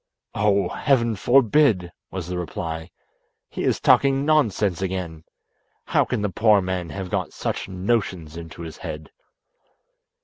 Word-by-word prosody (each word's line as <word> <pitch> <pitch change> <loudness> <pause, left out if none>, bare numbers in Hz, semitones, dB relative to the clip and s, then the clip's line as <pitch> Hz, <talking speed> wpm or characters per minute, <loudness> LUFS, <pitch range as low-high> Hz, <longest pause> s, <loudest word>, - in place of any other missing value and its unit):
"Oh! 100 -3 +2
heaven 115 -5 +1
forbid!" 115 - +3 0.2
was 95 -3 -5
the 90 0 -3
reply. 80 0 -5 0.6
"He - - -4
is - - +1
talking 135 0 +4
nonsense 110 - +2
again. 90 -4 -4 0.6
How - - +2
can 105 - -2
the 105 - +1
poor 105 +1 +4
man 90 -2 -3
have 95 +3 -6
got 95 -4 -2
such - - -3
notions 95 -4 -1
into 85 0 -8
his 80 -1 -8
head?" 75 0 -7
95 Hz, 135 wpm, -23 LUFS, 85-110 Hz, 0.6 s, talking